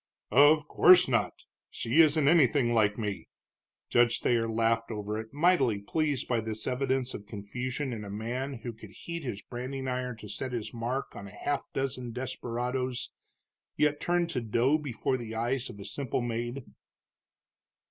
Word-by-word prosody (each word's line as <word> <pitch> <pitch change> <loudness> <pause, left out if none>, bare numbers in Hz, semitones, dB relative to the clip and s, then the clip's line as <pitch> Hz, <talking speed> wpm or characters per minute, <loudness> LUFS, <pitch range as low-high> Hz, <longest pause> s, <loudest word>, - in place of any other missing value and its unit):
"Of 145 +3 +6
course 180 +3 +7
not. 120 -3 +1 0.4
She 120 +8 +3
isn't 155 -2 +4
anything 140 -6 +4
like 105 -3 +3
me." 105 -4 -4 0.6
Judge 120 -1 +3
Thayer 115 -2 +2
laughed 115 +1 +1
over 105 -1 -3
it, 110 0 -8
mightily 145 - +3
pleased 145 +6 -1
by 120 -2 +1
this 110 0 -4
evidence 130 0 0
of 105 - -8
confusion 125 +6 -4
in 110 -2 -5
a 100 - -7
man 120 +7 -3
who 120 - -4
could 110 -1 -12
heat 170 - -7
his 115 -6 -5
branding 130 +2 -5
iron 125 -2 -2
to 105 - -10
set 130 +5 -5
his 115 -1 -4
mark 120 +3 -3
on 100 - -8
half 130 +8 -2
a - - -28
dozen 125 -3 -2
desperadoes, 125 0 -3 0.7
yet 150 -1 +2
turned 175 -1 +1
to 125 - -1
dough 120 +7 +2
before 130 -2 -2
the 115 -2 -7
eyes 120 +3 -1
of 100 - -10
a 100 - -8
simple 135 -3 -2
maid. 120 +2 -3
125 Hz, 165 wpm, -29 LUFS, 115-135 Hz, 0.7 s, course